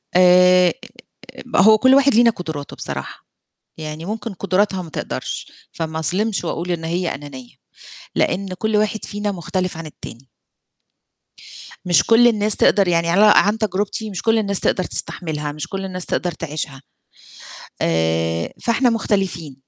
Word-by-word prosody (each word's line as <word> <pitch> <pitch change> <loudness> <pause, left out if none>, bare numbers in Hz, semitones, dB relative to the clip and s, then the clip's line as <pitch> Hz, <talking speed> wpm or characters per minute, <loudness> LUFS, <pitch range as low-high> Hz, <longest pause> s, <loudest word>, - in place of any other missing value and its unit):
آآ، 180 0 +6 0.8
هو 215 +1 +6
كُلّ 260 +3 +5
واحد 275 -3 +4
لينا 235 0 +6
قدراته 160 -8 -7
بصراحة، 70 -1 -7 0.5
يعني 155 +1 -7
ممكن 220 +2 -5
قدراتها 190 +1 0
ما 165 - -9
تقدرش، - - -5 0.2
فما 160 -1 -4
أظلمش 195 +7 0
وأقول 175 +1 -3
إن 165 -2 -3
هي 170 +2 -2
أنانيّة، 135 -3 -11 0.6
لأن 195 +1 0
كُلّ 220 +1 0
واحد 215 +1 0
فينا 205 0 -3
مختلف 185 -1 -3
عن 165 0 -7
التاني. 135 -4 -11 1.6
مش 175 -2 +4
كُلّ 230 +1 +5
الناس 215 -2 +2
تقدر 200 -3 +3
يعني 170 -1 +1
على 205 +4 +6
عن 210 +2 +4
تجربتي 210 +1 -2
مش 185 -3 -5
كُلّ 225 0 +2
الناس 200 -3 0
تقدر 185 - 0
تستحملها، 150 -5 -3
مش 150 0 -6
كُلّ 195 -1 -5
الناس 185 -1 -4
تقدر 175 - -2
تعيشها، 150 -3 -6 1.0
آآ، 80 0 0
فإحنا 240 +2 +2
مختلفين. 190 - -2
180 Hz, 140 wpm, -20 LUFS, 160-210 Hz, 1.6 s, آآ